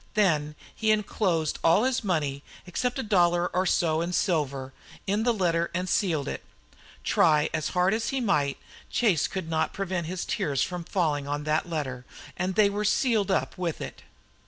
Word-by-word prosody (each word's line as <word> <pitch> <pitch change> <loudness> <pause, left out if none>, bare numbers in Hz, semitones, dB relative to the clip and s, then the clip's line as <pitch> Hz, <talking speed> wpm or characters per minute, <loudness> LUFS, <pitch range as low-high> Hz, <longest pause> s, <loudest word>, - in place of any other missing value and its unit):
Then 155 -8 +2 0.2
he 220 - 0
enclosed 190 -6 +1
all 165 +7 +5
his 260 -2 +1
money, 150 -8 -1 0.2
except 245 +8 -2
a 265 - -2
dollar 175 -4 +3
or 185 +1 0
so 160 -2 +2
in 175 +1 -2
silver, 140 -8 0 0.3
in 205 +2 0
the 240 +2 +3
letter 170 -5 +1
and 180 +1 -1
sealed 160 -8 +1
it. - - -4 0.6
Try 150 -2 +3
as 155 -2 -1
hard 180 +2 +4
as 225 +1 -1
he 270 - -1
might, 150 - +1 0.3
Chase 205 -10 +2
could 190 -4 -5
not 160 -1 0
prevent 185 -4 -2
his 180 +1 -3
tears 140 -3 0
from 180 -1 -4
falling 150 -7 0
on 145 +1 -2
that 155 +3 0
letter 135 -6 -3 0.3
and 185 +1 -2
they 210 0 +5
were 205 +1 -2
sealed 215 -2 +2
up 190 - 0
with 170 -3 -2
it. - - -7
175 Hz, 180 wpm, -27 LUFS, 155-200 Hz, 0.6 s, all